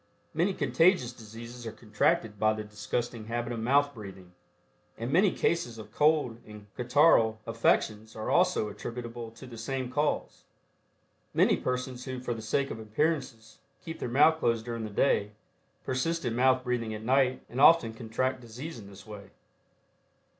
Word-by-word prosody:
Many 180 Hz, +5 st, +1 dB
contagious 140 Hz, -1 st, +3 dB
diseases 115 Hz, +1 st, -10 dB
are -, -, -4 dB
contracted 105 Hz, -1 st, 0 dB
by 110 Hz, 0 st, +3 dB
the 110 Hz, 0 st, -5 dB
disgusting 110 Hz, +2 st, -4 dB
habit 120 Hz, +1 st, -3 dB
of 115 Hz, -, -4 dB
mouth 140 Hz, +5 st, +2 dB
breathing, 95 Hz, -5 st, -11 dB, 0.6 s
and 115 Hz, +3 st, -4 dB
many 190 Hz, +4 st, +5 dB
cases 165 Hz, -10 st, -1 dB
of 110 Hz, -, -10 dB
cold 150 Hz, -6 st, +2 dB
and 105 Hz, -1 st, -12 dB
catarrhal 125 Hz, -3 st, +4 dB
affections 110 Hz, -1 st, 0 dB
are 110 Hz, -, -3 dB
also 180 Hz, -10 st, +3 dB
attributable 120 Hz, +2 st, -6 dB
to 115 Hz, +4 st, -13 dB
the 120 Hz, -3 st, -10 dB
same 130 Hz, +1 st, -3 dB
cause. 150 Hz, +3 st, -1 dB, 0.9 s
Many -, -, +4 dB
persons 125 Hz, 0 st, -3 dB
who, 130 Hz, -1 st, -5 dB
for 125 Hz, -1 st, -3 dB
the 115 Hz, -, -7 dB
sake 135 Hz, +5 st, -1 dB
of -, -, -6 dB
appearances, 115 Hz, 0 st, -2 dB, 0.3 s
keep 160 Hz, 0 st, -6 dB
their -, -, -3 dB
mouth 155 Hz, +6 st, +5 dB
closed 115 Hz, -5 st, 0 dB
during 115 Hz, -2 st, -4 dB
the -, -, -5 dB
day, 105 Hz, -1 st, +1 dB, 0.5 s
persist 165 Hz, +5 st, -1 dB
in 115 Hz, -2 st, -1 dB
mouth 130 Hz, +1 st, +3 dB
breathing 120 Hz, -3 st, -2 dB
at 110 Hz, -, -8 dB
night 130 Hz, +1 st, +2 dB
and 125 Hz, +3 st, -3 dB
often 145 Hz, -7 st, +6 dB
contract 125 Hz, +3 st, -2 dB
disease 125 Hz, +5 st, -8 dB
in 100 Hz, -, -11 dB
this 100 Hz, -1 st, -13 dB
way. 105 Hz, -2 st, -10 dB
120 Hz, 160 wpm, -29 LUFS, 110-135 Hz, 0.9 s, often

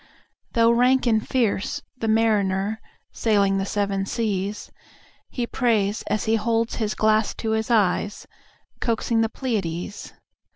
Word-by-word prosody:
Though 230 Hz, -1 st, +4 dB
rank 250 Hz, +3 st, +3 dB
and 220 Hz, -2 st, +3 dB
fierce 220 Hz, -5 st, -1 dB
the 230 Hz, -3 st, -4 dB
marinerSailing 205 Hz, -1 st, 0 dB
the 195 Hz, -, -2 dB
seven 200 Hz, -1 st, -1 dB
seas, 205 Hz, -2 st, -2 dB, 0.6 s
He 245 Hz, -, -2 dB
prays, 220 Hz, -4 st, 0 dB
as 210 Hz, +1 st, 0 dB
he 225 Hz, +1 st, +2 dB
holds 230 Hz, +1 st, 0 dB
his 215 Hz, -2 st, -1 dB
glass 215 Hz, 0 st, +2 dB
to 220 Hz, -, -3 dB
his 220 Hz, +1 st, -1 dB
eyes, 205 Hz, -2 st, +1 dB, 0.5 s
Coaxing 230 Hz, 0 st, 0 dB
the 225 Hz, -, +1 dB
Pleiades. 200 Hz, -7 st, -4 dB
220 Hz, 125 wpm, -23 LUFS, 200-230 Hz, 0.6 s, Though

